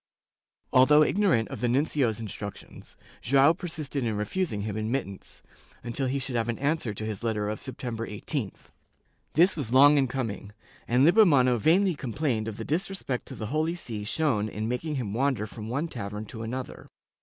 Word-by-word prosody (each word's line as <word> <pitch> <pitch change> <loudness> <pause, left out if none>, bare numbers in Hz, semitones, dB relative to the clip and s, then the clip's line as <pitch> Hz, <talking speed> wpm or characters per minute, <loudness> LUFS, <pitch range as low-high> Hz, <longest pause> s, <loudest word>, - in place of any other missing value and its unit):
^ - - -66 0.7
Although 150 +4 +7
ignorant 170 - +2
of - - -7
the 125 - +2
nuncio's 130 -4 +1
instructions, 105 -2 -8 0.2
Joao 140 +5 +5
persisted 155 -6 -4
in 110 -3 -1
refusing 105 - -2
him 105 0 -4
admittance, 110 -2 -4 0.4
until 125 +3 -2
he 135 +2 -1
should 130 -2 -4
have 115 0 0
an 115 - -2
answer 145 -4 -1
to 105 +1 -5
his 110 -3 -4
letter 105 -3 -1
of 110 - -4
September 120 -3 -5
18th. 105 - -5 0.6
This 175 +6 +5
was 130 -6 -2
long 145 +2 +7
in 135 - +2
coming, 115 -5 -4 0.3
and 125 +3 +4
Lippo 210 +7 +7
mano 130 - +4
vainly 180 - +3
complained 125 -4 -2
of 110 -1 -5
the 115 - -5
disrespect 165 -5 -2
to - - -8
the 110 +4 -5
Holy 160 +2 0
See 115 -11 -6
shown 110 -3 0
in 110 +1 -4
making 145 +6 -2
him 115 -7 -3
wander 130 -2 0
from 110 0 -8
one 140 +7 -1
tavern 105 -6 -6
to 110 +1 -8
another. 125 +3 -6
125 Hz, 180 wpm, -27 LUFS, 110-150 Hz, 0.7 s, Although